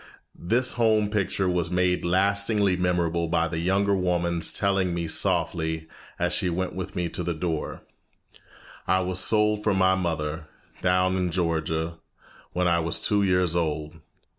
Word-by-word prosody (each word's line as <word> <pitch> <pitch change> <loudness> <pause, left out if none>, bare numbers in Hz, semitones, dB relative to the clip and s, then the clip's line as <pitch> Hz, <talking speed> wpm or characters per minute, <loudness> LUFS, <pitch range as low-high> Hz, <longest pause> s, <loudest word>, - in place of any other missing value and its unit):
This 120 +7 0
home 110 -2 +3
picture 100 -2 0
was 90 -2 0
made 90 0 +1
lastingly 100 +2 +2
memorable 85 -2 0
by 85 0 +1
the 80 0 -3
younger 100 +3 +2
woman's 85 -2 0
telling 95 -3 0
me 85 -1 -2
softly 80 0 0 0.3
as 90 0 0
she 95 -4 0
went 90 +2 -2
with 95 - -6
me 90 -2 -1
to 90 - -4
the 85 -1 -2
door, 80 -1 -3 1.0
"I 95 +1 +3
was 90 0 -2
sold 105 +1 +2
from 105 -3 +1
my 95 0 +4
mother, 80 -3 -2 0.3
down 90 +1 +2
in 90 -1 0
Georgia, 80 -1 -1 0.5
when 90 0 0
I 85 -1 +3
was 85 0 -1
two 105 -1 +1
years 90 -3 +2
old. 80 -1 -2
90 Hz, 155 wpm, -25 LUFS, 85-95 Hz, 1.0 s, my